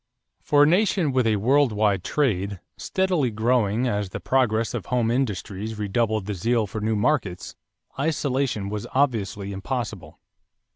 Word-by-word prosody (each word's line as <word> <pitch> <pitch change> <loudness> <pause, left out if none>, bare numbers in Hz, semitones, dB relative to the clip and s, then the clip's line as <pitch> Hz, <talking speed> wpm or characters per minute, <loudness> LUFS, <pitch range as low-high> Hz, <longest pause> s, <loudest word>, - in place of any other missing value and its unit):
= - - -53
For 145 0 +6
a - - +7
nation 180 -2 +2
with 130 -3 +2
a 110 - +3
world 130 +5 +3
wide 105 -3 +1
trade, 100 - 0 0.2
steadily 185 -8 0
growing, 115 +1 +1
as 105 -4 -1
the - - -6
progress 115 -4 +1
of - - -5
home 120 -2 +1
industries 110 -3 -2
redoubled 105 0 0
the 105 - -3
zeal 115 +4 +1
for 105 +2 -6
new 110 +1 0
markets, 105 -6 -1 0.5
isolation 135 -8 -1
was 105 0 -4
obviously 105 -7 0
impossible. 105 -1 -5
110 Hz, 150 wpm, -24 LUFS, 105-135 Hz, 0.5 s, a